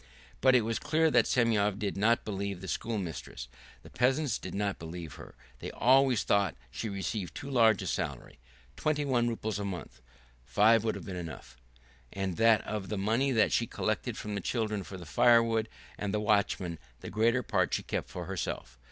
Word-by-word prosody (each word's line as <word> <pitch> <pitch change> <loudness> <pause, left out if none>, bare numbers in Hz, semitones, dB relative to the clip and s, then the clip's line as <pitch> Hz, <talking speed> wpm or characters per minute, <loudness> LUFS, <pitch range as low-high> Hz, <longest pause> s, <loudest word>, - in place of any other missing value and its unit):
But 130 -1 +6
it 125 - +6
was 115 +1 -2
clear 160 +1 +2
that 120 -4 +4
Semyon 105 -5 +2
did 105 -2 -2
not 115 +4 +2
believe 100 -2 -3
the 95 - -8
schoolmistress. 90 - -4 0.4
The - - -14
peasants 130 +1 +1
did 90 - -7
not 100 -1 -1
believe 80 -2 -7
her. - - -12 0.2
They - - -5
always 130 -1 +4
thought 100 -4 +2 0.2
she 110 - -4
received 100 -1 -4
too 140 -3 -6
large 110 -6 +4
a - - -5
salary, - - -4 0.4
twenty 150 -1 0
one 120 -3 +2
roubles 110 -2 -3
a - - -3
month 90 -11 -6 0.4
(five 105 - +4
would 110 - 0
have - - -8
been 95 - -5
enough), 80 -7 -8 0.6
and 95 -3 -3
that 115 -1 +5
of 105 -3 -4
the 105 - -2
money 115 +8 +1
that 110 -4 +3
she - - +1
collected - - -2
from 105 - -5
the 100 - -2
children 110 0 -1
for 95 0 -8
the 90 - -10
firewood 115 +4 +4 0.3
and 105 -1 -2
the 105 - 0
watchman 100 -5 0 0.2
the - - -7
greater 115 +5 +2
part - - +1
she - - -3
kept - - -3
for 90 - -6
herself. 75 -9 -5
105 Hz, 190 wpm, -30 LUFS, 95-115 Hz, 0.6 s, But